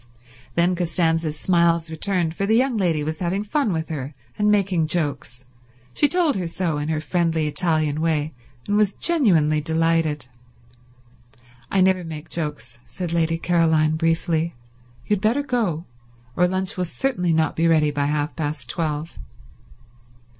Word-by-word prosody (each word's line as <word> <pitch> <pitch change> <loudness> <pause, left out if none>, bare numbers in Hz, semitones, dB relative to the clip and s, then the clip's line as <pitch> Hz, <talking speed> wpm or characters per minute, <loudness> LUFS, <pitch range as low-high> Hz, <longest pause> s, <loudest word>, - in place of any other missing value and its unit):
Then 175 +2 +3
Costanza's 165 -3 0
smiles 170 -2 +2
returned, 170 0 -1
for 195 - -1
the 220 - +3
young 255 +1 +2
lady 170 -7 +1
was 155 +1 -3
having 185 +3 -1
fun 225 +2 0
with 160 -2 -3
her 145 -2 -5 0.2
and 210 0 +1
making 195 -6 +2
jokes. 140 -6 -2 0.5
She 290 - +3
told 340 -4 +2
her 180 -3 -2
so, 165 -3 -2
in 150 +1 -3
her 155 -1 0
friendly 165 -1 0
Italian 155 -1 0
way, 155 -1 0 0.3
and 205 - +1
was 210 -2 +2
genuinely 170 - +2
delighted. 160 -3 +1 1.4
"I 195 - +2
never 185 -1 +3
make 160 -1 -8
jokes," 150 -7 -5
said 170 +8 -5
Lady 165 -1 +1
Caroline 160 -2 +2
briefly. 165 0 0 0.5
"You 210 - +1
had - - -10
better 235 +7 +2
go, 210 - -1 0.5
or 180 - +3
lunch 185 +1 -2
will 180 - 0
certainly 180 -3 -1
not 160 -1 +1
be 165 +1 +2
ready 155 -2 +3
by 145 -1 -1
half 150 +1 -1
past 145 -5 -3
twelve." 155 - -3
165 Hz, 155 wpm, -22 LUFS, 155-185 Hz, 1.4 s, Then